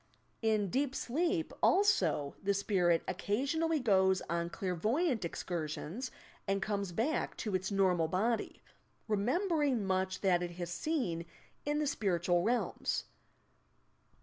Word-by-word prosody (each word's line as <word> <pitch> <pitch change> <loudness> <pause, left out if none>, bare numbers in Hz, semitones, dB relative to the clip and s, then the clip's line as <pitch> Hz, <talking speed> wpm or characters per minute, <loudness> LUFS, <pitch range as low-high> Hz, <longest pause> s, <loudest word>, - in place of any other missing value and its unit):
In 215 -4 +1
deep 275 0 0
sleep, 330 +6 -1
also, 380 - +3
the 200 0 +1
spirit 180 -4 +2
occasionally 280 - 0
goes 190 -6 +3
on 170 +1 -1
clairvoyant 220 - 0
excursions, 170 - -4 0.4
and 195 0 +1
comes 200 -2 -2
back 235 - -1
to 215 -4 -3
its 185 0 0
normal 185 -5 +2
body,— 215 +7 -1 0.4
remembering 260 - +1
much 185 0 0
that 180 -3 +3
it 175 -1 -3
has 175 0 -5
seen 175 - -2 0.4
in 295 0 +1
the 300 - +1
spiritual 175 - +1
realms. 235 +6 0
200 Hz, 120 wpm, -33 LUFS, 180-260 Hz, 0.4 s, also